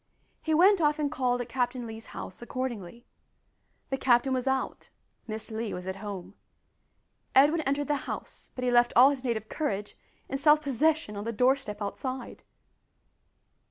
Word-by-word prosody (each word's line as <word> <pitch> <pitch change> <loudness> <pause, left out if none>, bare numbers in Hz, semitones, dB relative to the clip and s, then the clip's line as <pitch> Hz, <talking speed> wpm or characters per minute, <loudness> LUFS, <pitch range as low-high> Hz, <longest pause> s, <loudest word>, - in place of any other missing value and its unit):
He 315 -1 +1
went 375 +3 +6
off 300 0 +3
and 295 -1 -1
called 250 -4 0
at 240 - -6
Captain 245 0 -1
Lee's 225 0 -8
house 185 - -8
accordingly. 240 -3 -5 0.9
The 270 - +1
captain 255 +1 +3
was 255 0 -1
out 265 0 -2 0.4
Miss 220 0 -5
Lee 220 0 -3
was 180 0 -7
at 190 0 -4
home. 195 -2 -7 1.0
Edwin 295 +5 +6
entered 285 0 -1
the 295 -1 +1
house, - - -7
but 250 - -4
he 250 - +2
left 240 0 +4
all 260 +4 +8
his 270 -2 -5
native 225 -4 -2
courage 210 -9 -3 0.3
and 270 - -3
self 300 +1 +6
possession 295 -3 +1
on 205 - -4
the 230 - -2
doorstep 250 -3 +1
outside! 255 +5 -5
250 Hz, 160 wpm, -28 LUFS, 220-280 Hz, 1.0 s, all